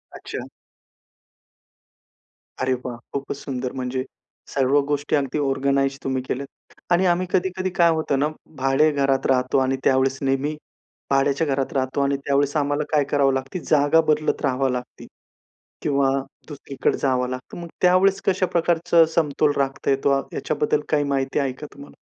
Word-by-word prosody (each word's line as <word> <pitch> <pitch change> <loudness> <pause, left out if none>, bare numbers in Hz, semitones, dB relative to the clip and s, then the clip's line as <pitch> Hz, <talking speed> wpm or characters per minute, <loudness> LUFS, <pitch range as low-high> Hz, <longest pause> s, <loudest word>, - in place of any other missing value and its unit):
अच्छा. - - -7 2.1
अरे 130 0 +1
वाह! 125 -2 -5 0.2
खूपच 140 0 -3
सुंदर 130 -2 -4
म्हणजे 130 0 -3 0.5
सर्व 135 +1 +3
गोष्टी 145 +1 0
अगदी 140 0 -1
ऑर्गनाइज 135 0 +1
तुम्ही 130 -1 -1
केल्यात. 135 +2 -4 0.4
आणि 175 +2 +4
आम्ही 180 +1 +2
कधी-कधी 185 0 0
काय 170 -1 +6
होतं 155 -4 0
ना 145 - +2 0.3
भाड्याच्या 135 +4 +3
घरात 135 -2 +1
राहतो 130 0 +2
आणि 135 +1 0
त्यावेळेस 135 0 +2
नेहमी 135 +2 0 0.6
भाड्याच्या 140 +3 +2
घरात 135 -1 -1
राहतो 130 0 -1
आणि 140 0 +1
त्यावेळेस 140 +1 +1
आम्हाला 145 0 0
काय 150 -2 +3
करावं 140 -2 +3
लागतं 135 +6 -3
जागा 150 +2 +4
बदलत 155 0 +1
राहावं 135 -1 +1
लागते 125 0 -6 0.8
किंवा 140 -2 +2 0.4
दुसरीकडे 140 -2 -2
जावं 125 -2 0
लागतं. 130 0 -7
मग 170 - -7
त्यावेळेस 190 +2 +4
कशा 190 -1 +2
प्रकारचा 170 -1 +3
समतोल 150 -2 +2
राखता 135 0 -1
येतो 135 0 +2
याच्याबद्दल 445 0 0
काही 150 -2 +2
माहिती 135 -1 -1
आहे 135 -2 0
का 130 - -9
तुम्हाला? 140 +1 -13
140 Hz, 145 wpm, -23 LUFS, 135-155 Hz, 2.1 s, काय